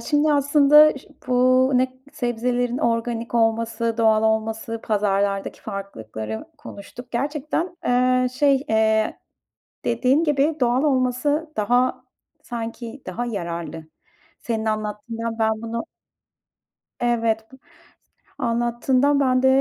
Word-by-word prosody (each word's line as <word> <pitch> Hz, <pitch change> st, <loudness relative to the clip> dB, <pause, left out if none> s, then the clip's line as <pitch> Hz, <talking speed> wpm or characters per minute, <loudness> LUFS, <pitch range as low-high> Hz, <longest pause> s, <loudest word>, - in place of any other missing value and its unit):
şimdi 295 Hz, 0 st, +2 dB
aslında 290 Hz, +1 st, +5 dB
ş -, -, -19 dB, 0.2 s
bu 255 Hz, +1 st, +4 dB
ne 255 Hz, +1 st, +4 dB
k 255 Hz, -, -23 dB, 0.2 s
sebzelerin 245 Hz, +1 st, -1 dB
organik 230 Hz, 0 st, -1 dB
olması, 230 Hz, 0 st, +1 dB
doğal 220 Hz, -1 st, +4 dB
olması, 220 Hz, +1 st, -1 dB
pazarlardaki 200 Hz, -2 st, 0 dB
farklılıkları 110 Hz, -, -6 dB
konuştuk. 240 Hz, +5 st, -11 dB
Gerçekten, 300 Hz, +7 st, -2 dB
eee, 255 Hz, 0 st, +2 dB
şey, 275 Hz, +1 st, +2 dB
eee, 220 Hz, 0 st, +2 dB, 0.7 s
dediğin 255 Hz, +7 st, +2 dB
gibi 295 Hz, +1 st, +1 dB
doğal 245 Hz, +2 st, +2 dB
olması 290 Hz, +3 st, 0 dB
daha, 245 Hz, +4 st, +1 dB, 0.4 s
sanki, 235 Hz, +2 st, -6 dB
daha 240 Hz, +7 st, -3 dB
yararlı. 170 Hz, -6 st, -5 dB, 0.5 s
Senin 225 Hz, -2 st, -3 dB
anlattığından 220 Hz, +2 st, -3 dB
ben 220 Hz, 0 st, +2 dB
bunu 230 Hz, +4 st, -4 dB, 1.2 s
Evet 230 Hz, -1 st, 0 dB
b -, -, -12 dB, 0.8 s
anlattığından 245 Hz, +4 st, +1 dB
ben 255 Hz, -2 st, +2 dB
de -, -, +5 dB
240 Hz, 105 wpm, -22 LUFS, 220-260 Hz, 1.2 s, aslında